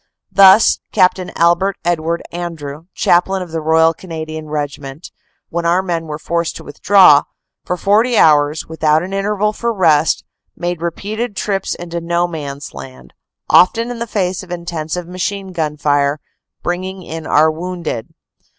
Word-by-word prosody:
Thus, 195 +2 +6
Capt. 185 +1 +3
Albert 180 +2 +1
Edward 170 -1 -1
Andrew, 165 -3 -6
chaplain 185 +2 +2
of 175 - -11
the 165 0 -3
Royal 160 +1 +3
Canadian 160 -2 -7
Regiment, 145 0 -5 0.4
when 170 +1 -2
our 175 +3 +2
men 170 -3 -3
were 150 -1 -5
forced 170 +1 -2
to - - -9
withdraw, 150 -1 +5 0.4
for 180 - -2
40 220 +6 +2
hours, 150 -1 +4
without 160 0 +1
an 190 +2 -6
interval 210 +1 0
for 235 +2 -2
rest, 160 -7 +2 0.3
made 175 -1 -3
repeated 205 +6 -4
trips 195 -1 -2
into 170 -1 -6
No 170 +1 0
Man 145 -5 -6
s 140 - -10
Land, 65 -2 -11 0.3
often 230 +6 +4
in 235 -1 -5
face 190 -3 -1
of 185 - -13
intensive 170 -1 -4
machine 190 +2 -4
gun 155 -4 -2
fire, 145 0 +1 0.4
bringing 185 +2 -4
in 160 -1 -7
our 155 +2 +4
wounded. 170 -7 -5
170 Hz, 150 wpm, -17 LUFS, 155-190 Hz, 0.4 s, Thus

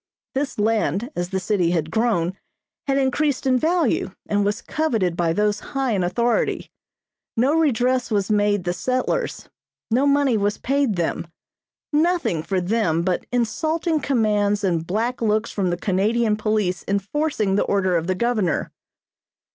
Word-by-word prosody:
This 275 +1 -2
land, 215 - 0
as 175 0 -2
the 190 0 -1
city 185 -2 +1
had 160 -2 -1
grown, 195 -6 +1 0.5
had 275 0 +2
increased 275 +1 0
in 255 -1 +3
value 325 - +1 0.2
and 205 0 +1
was 205 +2 -1
coveted 225 - 0
by 170 -1 +1
those 210 +3 +1
high 270 0 -2
in 195 -4 +1
authority. 235 +7 0 0.7
No 260 +6 +3
redress 255 -5 +2
was 205 -2 0
made 205 -2 +2
the 175 0 -1
settlers, 255 - -2 0.4
no 260 +5 +3
money 280 -4 +3
was 205 0 0
paid 275 -4 0
them, 170 0 -2 0.7
nothing 320 - +1
for 190 +3 -1
them 180 -4 0
but 180 0 -1
insulting 310 +8 0
commands 210 -6 +1
and 170 -4 0
black 230 +7 -1
looks 220 0 +1
from 190 -3 -1
the 175 - -1
Canadian 210 +4 +1
police 210 -4 -1
enforcing 200 +2 0
the - - +2
order 190 -3 +1
of 165 0 0
the 185 - +1
governor. 215 -6 0
215 Hz, 150 wpm, -22 LUFS, 190-255 Hz, 0.7 s, in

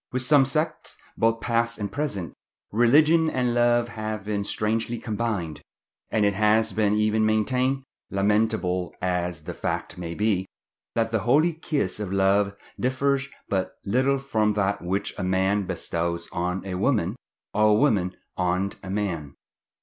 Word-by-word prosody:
With 130 0 -1
some 135 +1 +5
sects, 155 +4 -2 0.2
both 115 0 +1
past 115 -1 0
and 100 -2 -4
present, 100 - -3 0.4
religion 155 +8 +5
and 125 -4 0
love 120 0 +3
have 110 -3 -5
been 105 -1 -1
strangely 115 +3 -1
combined; 110 -8 -3 0.5
and 110 -2 +2
it 100 - +3
has 110 +2 +3
even 105 -1 +3
been 110 0 +2
maintained, 125 +5 +1 0.3
lamentable 100 -3 0
as 90 -3 -2
the 90 +2 -5
fact 90 - -4
may 85 -1 -5
be, 105 -3 +1 0.5
that 115 -1 +1
the 110 - +1
holy 145 - +3
kiss 150 - -2
of 100 -3 -4
love 100 +1 +2 0.2
differs 135 +2 +1 0.2
but 95 -2 -1
little 130 +6 +2
from 110 -6 +1
that 100 0 0
which 95 +3 -2
a - - -2
man 95 +1 +1
bestows 85 0 -2
on 90 +2 -2
a 95 - -4
woman, 100 -1 +1 0.4
or 105 +1 +3
a 105 - +5
woman 100 -8 +2 0.2
on 90 +2 0
a 95 - -8
man. 90 -8 -3
105 Hz, 150 wpm, -25 LUFS, 95-120 Hz, 0.5 s, some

